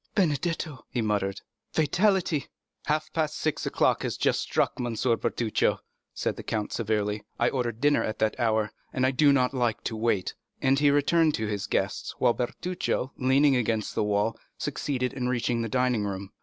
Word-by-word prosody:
"Benedetto?" 160 -4 0
he 125 - -3
muttered; 100 -2 -1 0.3
"fatality!" 175 0 +2 0.4
"Half 155 0 -1
past 155 -2 -1
six 155 - -1
o'clock - - +2
has - - -2
just - - +2
struck, - - +1
M. 120 -2 -2
Bertuccio," 115 -1 +1 0.3
said - - -2
the - - -5
count 110 -2 -3
severely; 105 -2 -1
"I 120 - +3
ordered 120 -4 -2
dinner 145 0 +3
at 110 - -3
that 110 0 0
hour, 110 -2 +1 0.2
and 130 - +1
I 130 - +3
do 145 +2 +5
not 130 -1 +2
like 120 -4 0
to 115 - -3
wait;" 110 -4 0 0.3
and 135 +1 +3
he 145 0 +5
returned 150 +2 +3
to 110 - -2
his 105 -2 -3
guests, - - -1
while 120 - +3
Bertuccio, 140 +1 -2
leaning 135 +2 +4
against 115 -3 0
the - - 0
wall, 105 +2 0 0.2
succeeded 125 -3 -2
in 125 -2 -2
reaching 120 -1 0
the 115 - -2
dining 125 -2 +1
room. 100 -1 -5
125 Hz, 175 wpm, -27 LUFS, 110-145 Hz, 0.4 s, do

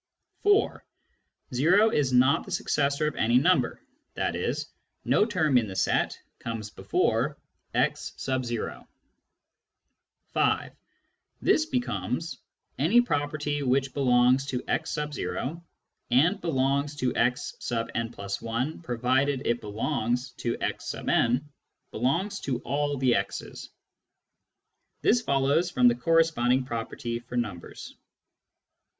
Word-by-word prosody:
(4) 410 0 +2 0.4
" - - -23
o 200 +8 +5
is 140 -8 +1
not 130 +2 +4
the - - -12
successor 140 +1 0
of 150 - -1
any 120 +2 +3
number," 180 +8 +2 0.4
i.e. - - 0 0.5
no - - +4
term 155 - +3
in 110 - -3
the 95 - -7
set - - +1 0.2
comes 110 -2 -5
before - - 0 0.4
x. - - 0
(5) 125 -3 -3 2.5
This 315 - +3
becomes: 175 - -2 0.4
Any 190 - +5
property 145 -6 -1
which 135 0 +1
belongs 130 0 +3
to 125 -2 -3
x, 160 - -1
and 150 +1 -3 0.8
belongs 140 -2 0
to 130 -3 -1
x 125 +1 0
n+1 115 - -3
provided 130 +2 0
it 120 0 0
belongs 120 +3 -2
to 120 -1 -2
x„, - - -3 1.0
belongs 175 - 0
to 130 -3 -2
all 145 +2 -1
the 130 -2 +3
x's. 100 -1 -3 1.3
This 240 +1 +4
follows 140 - +2
from 125 -7 +4
the 120 - +6
corresponding 130 -2 +2
property 115 0 -4
for 120 +1 -10
numbers. 105 -8 -5
130 Hz, 105 wpm, -27 LUFS, 120-150 Hz, 2.5 s, the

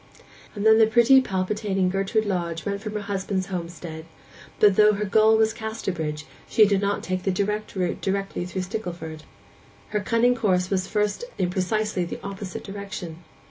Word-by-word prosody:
And 205 0 -3
then 220 0 +7
the 220 - +6
pretty 240 +4 +6
palpitating 190 -2 -1
Gertrude 195 +3 0
Lodge 170 -5 -2
went 200 0 -2
from 215 0 -5
her 210 - -2
husband's 195 -1 -2
homestead; 170 -2 -6 0.5
but 205 -2 +6
though 210 +1 +6
her 210 +1 -2
goal 220 +2 +4
was 220 0 +3
Casterbridge 180 -9 -4 0.2
she 215 - +6
did 200 -1 +2
not 200 0 -1
take 185 0 -2
the 195 - -1
direct 210 +3 -2
route 180 -2 -1
thither 195 0 0 0.2
through 185 +1 -3
Stickleford. 175 -6 -6 0.6
Her 210 - 0
cunning 230 +3 +3
course 190 -6 +1
at 195 - +2
first 190 +3 -7 0.3
was 485 - -7
in 180 -1 0
precisely 200 +1 0
the 175 - -5
opposite 195 -2 -6
direction. 195 -4 -7
200 Hz, 175 wpm, -24 LUFS, 185-215 Hz, 0.6 s, then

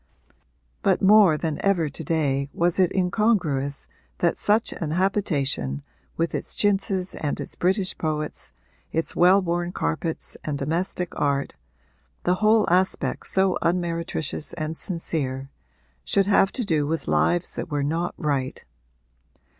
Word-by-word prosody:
But - - +2
more 195 -5 +6
than 155 -1 -3
ever 185 -5 +2
to 150 +3 -6
day 140 -3 0
was 175 +2 +1
it 185 -2 +4
incongruous 180 -8 0 0.3
that 170 - +1
such 215 +2 +2
an 160 - -4
habitation, 150 - 0 0.3
with 165 0 0
its - - -4
chintzes 195 -2 +1
and 145 - -3
its - - -6
British 190 +1 +1
poets, 150 - -3 0.4
its 165 +1 -1
well 180 +3 +6
worn 175 0 -1
carpets 120 - -3
and 150 -2 -2
domestic 170 +5 -2
art 140 -1 0 0.7
the 180 - +3
whole 215 0 +4
aspect 185 +2 +1
so 190 -1 +1
unmeretricious 170 -3 -1
and 155 -1 -4
sincere 140 -7 -3 0.5
should 195 - +2
have 195 -1 +4
to 250 - -1
do 155 -6 +1
with 160 +1 -2
lives 175 0 +1
that - - -5
were 145 -2 -1
not 165 +4 -1
right. 140 -3 -2
170 Hz, 135 wpm, -24 LUFS, 150-185 Hz, 0.7 s, more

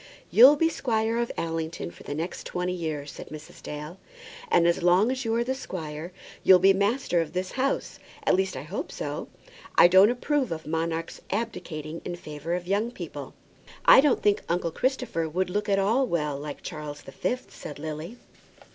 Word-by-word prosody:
"You'll 260 +6 +9
be 325 +2 +3
squire 230 -6 0
of 235 - -1
Allington 165 - -3
for 85 - -16
the 145 - -5
next 165 +4 -4
twenty 180 0 -2
years," 155 -5 -4
said - - -9
Mrs. 150 -1 -11
Dale. 150 +4 -7 0.5
"And 170 - +4
as 170 - +2
long 180 +7 +4
as 260 0 -2
you 225 0 +1
are 235 - +2
the 260 +2 -1
squire, 165 - -6 0.3
you'll 185 - +8
be 195 +2 +5
master 200 -2 +1
of 165 - -5
this 185 0 -2
house; 270 +1 -1 0.3
at - - +4
least, 190 -5 +1
I 130 - -5
hope 205 - -5
so. - - -4 0.5
I - - +8
don't 190 +4 +7
approve 260 - 0
of 160 -1 -4
monarchs 165 +1 -2
abdicating 165 -8 -4
in 175 - -4
favour 155 0 -4
of 180 0 -4
young 200 +5 0
people." 245 - -8 0.5
"I - - +9
don't 285 -2 +2
think 205 -1 +3
uncle 170 -1 0
Christopher 245 - -1
would 180 +3 -1
look 210 +2 -1
at 195 - +3
all 225 +7 +2
well 150 -6 -1
like 145 +1 -7
Charles 150 -3 -7
the - - -10
Fifth," 250 - -3
said 145 - -8
Lily. 155 +8 -6
180 Hz, 190 wpm, -27 LUFS, 160-225 Hz, 0.5 s, You'll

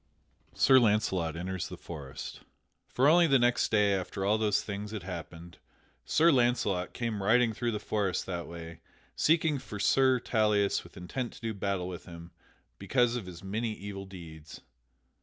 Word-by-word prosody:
[Sidenote: - - -19
Sir 130 -1 +7
Launcelot 105 -8 +1
enters 90 +1 -4
the - - -8
forest] 70 -6 -8 0.5
For 130 +3 +2
only 170 +2 +6
the 140 -3 +5
next 120 -1 +2
day 105 -2 +3
after 95 0 -3
all 105 +2 +2
these 105 -2 +1
things 105 0 -5
had 105 -4 -6
happened, 85 -1 -8 0.5
Sir 165 +2 +4
Launcelot 120 - +1
came 115 -4 -3
riding 115 +3 +3
through 120 +2 -2
the 105 - -3
forest 100 -4 -1
that 85 -2 -4
way, 85 -1 -9 0.4
seeking 160 -2 +2
for 105 - -8
Sir 130 +5 +3
Tauleas 105 -4 +1
with - - -16
intent 115 +8 -5
to - - -14
do 115 -1 -3
battle 100 -2 -2
with 90 -2 -7
him 85 -1 -11 0.5
because 120 -2 +1
of 115 -7 -5
his 90 -1 -10
many 110 +3 -2
evil 100 -1 -7
deeds. 80 -5 -11
100 Hz, 170 wpm, -30 LUFS, 90-120 Hz, 0.5 s, Sir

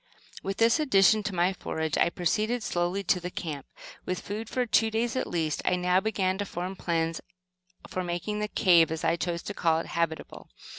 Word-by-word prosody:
With 195 0 -4
this 230 +6 +4
addition 215 - +4
to 205 -2 -4
my 180 +2 +2
forage, 160 -4 -3
I - - +3
proceeded 215 +8 0
slowly 175 +2 -1
to 180 - +2
the 180 0 -5
camp. 150 -6 -6 0.4
With 185 0 -3
food 215 +2 -5
for 255 -1 0
two 225 -1 +3
days 225 +2 -1
at 255 - -1
least, 160 -3 -1
I 180 - +2
now 180 +1 +2
began 190 -2 -1
to 205 - -1
form 180 +2 -4
plans 165 -2 -1 0.7
for 185 - -3
making 175 +4 -3
the 210 - -1
"cave," 170 -6 +4
as 160 0 -3
I 165 0 +2
chose 170 0 -3
to 205 - -5
call 165 -4 +2
it, 165 - -3
habitable. 165 -1 -3
180 Hz, 200 wpm, -28 LUFS, 170-210 Hz, 0.7 s, this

